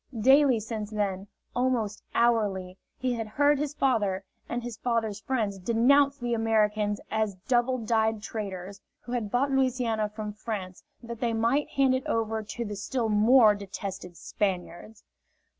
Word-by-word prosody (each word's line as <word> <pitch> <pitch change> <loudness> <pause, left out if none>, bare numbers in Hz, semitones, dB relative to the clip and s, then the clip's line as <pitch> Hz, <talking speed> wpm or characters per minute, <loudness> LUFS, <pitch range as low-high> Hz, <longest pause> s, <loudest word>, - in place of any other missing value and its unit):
Daily 265 0 +5
since 215 -1 -5
then, 200 -2 -2 0.3
almost 245 -5 0
hourly, 200 -6 +1 0.2
he 255 -1 -1
had 225 -2 -3
heard 285 +5 +2
his 295 0 -3
father 205 -9 +1 0.3
and 240 0 -3
his 240 -2 -5
father's 225 -3 -1
friends 215 -5 -2
denounce 275 +7 +3
the 240 -3 -2
Americans 215 -2 +1
as 220 -2 0
double 255 0 +2
dyed 220 -1 +1
traitors, 195 -3 -6 0.2
who 240 - -10
had 235 -4 -2
bought 265 +5 +1
Louisiana 250 -5 +1
from 210 0 -6
France 205 -4 -6 0.2
that 235 -1 -7
they 235 -2 0
might 235 +6 +1
hand 270 -1 +2
it 260 0 -2
over 225 -1 -1
to 215 +3 -5
the 210 -1 -5
still 225 +3 -2
more 215 +1 +6
detested 195 -3 -7
Spaniards. 195 +1 -4
225 Hz, 150 wpm, -27 LUFS, 205-245 Hz, 0.3 s, more